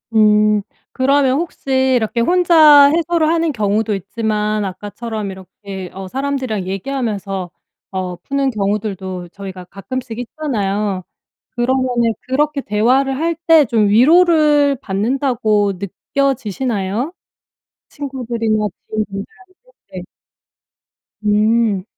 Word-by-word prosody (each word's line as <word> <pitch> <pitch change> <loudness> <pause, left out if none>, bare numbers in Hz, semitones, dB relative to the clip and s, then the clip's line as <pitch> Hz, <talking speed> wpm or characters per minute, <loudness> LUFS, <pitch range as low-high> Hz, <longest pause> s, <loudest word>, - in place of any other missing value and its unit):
음. 210 -1 +4 0.3
그러면 270 0 +2
혹시 265 -5 0
이렇게 235 0 0
혼자 315 -2 +6
해소를 330 +1 +1
하는 330 0 +1
경우도 215 -2 0
있지만 210 +1 -2
아까처럼 205 +2 -5
이렇게 190 0 -9
어 190 0 -7
사람들이랑 260 -4 -3
얘기하면서 195 -3 -3 0.4
어 185 -1 -3
푸는 275 +7 -1
경우들도 195 -4 -3
저희가 190 -1 -9
가끔씩 240 +5 -6
있잖아요. 210 - -2 0.5
그러면은 245 -2 +1
그렇게 285 +2 0
대화를 260 +6 +1
할 330 +2 0
때 320 -3 +7
좀 220 -3 +2
위로를 300 - +5
받는다고 215 -1 0
느껴지시나요, 230 - -2 0.8
친구들이나 235 -6 -2 0.2
지인분들한테? 215 - -5 0.5
네. - - -6 1.2
음. 210 -1 +2
230 Hz, 260 characters per minute, -17 LUFS, 200-275 Hz, 1.2 s, 때